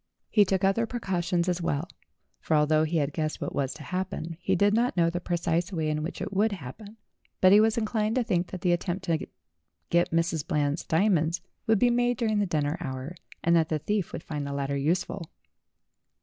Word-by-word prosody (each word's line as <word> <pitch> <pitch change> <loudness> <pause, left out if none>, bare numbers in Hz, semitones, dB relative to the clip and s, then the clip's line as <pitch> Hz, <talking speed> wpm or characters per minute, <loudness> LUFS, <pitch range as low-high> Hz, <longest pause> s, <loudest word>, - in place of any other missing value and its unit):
He 205 -2 +5
took 190 0 0
other 195 +4 +2
precautions 180 -6 -1
as 180 -1 0
well, 150 +1 -1 0.5
for 160 - 0
although 155 +1 +3
he 165 +2 -1
had 145 -1 0
guessed 155 -2 -2
what - - -4
was 135 -1 -1
to 150 - -10
happen, 170 +1 -4
he 190 - +1
did 205 +3 +3
not 235 -1 +1
know 170 -1 +3
the 175 - -2
precise 175 0 -1
way 160 -4 -1
in 150 0 -1
which 160 +4 -5
it - - -5
would 210 +2 +2
happen; 200 - -9 0.4
but 185 - +6
he 205 - +8
was 220 +1 +3
inclined 215 0 0
to 255 - +2
think 180 -6 0
that 185 - -7
the 180 - +2
attempt 175 +2 -1
to 165 -3 -1 0.6
get 170 0 +3
Mrs. 165 -2 0
Eland's 145 +1 0
diamonds 170 -1 +2 0.3
would 220 -1 +4
be 240 +4 +4
made 245 0 +2
during 220 -3 +1
the 205 - +1
dinner 150 -1 0
hour, 130 +4 -5 0.3
and 170 0 +4
that 160 -2 +3
the 155 - +1
thief 200 +4 -2
would - - -6
find 145 -2 -4
the 140 - -4
ladder 140 0 -2
useful. 165 +4 -1
175 Hz, 210 wpm, -27 LUFS, 155-200 Hz, 0.6 s, he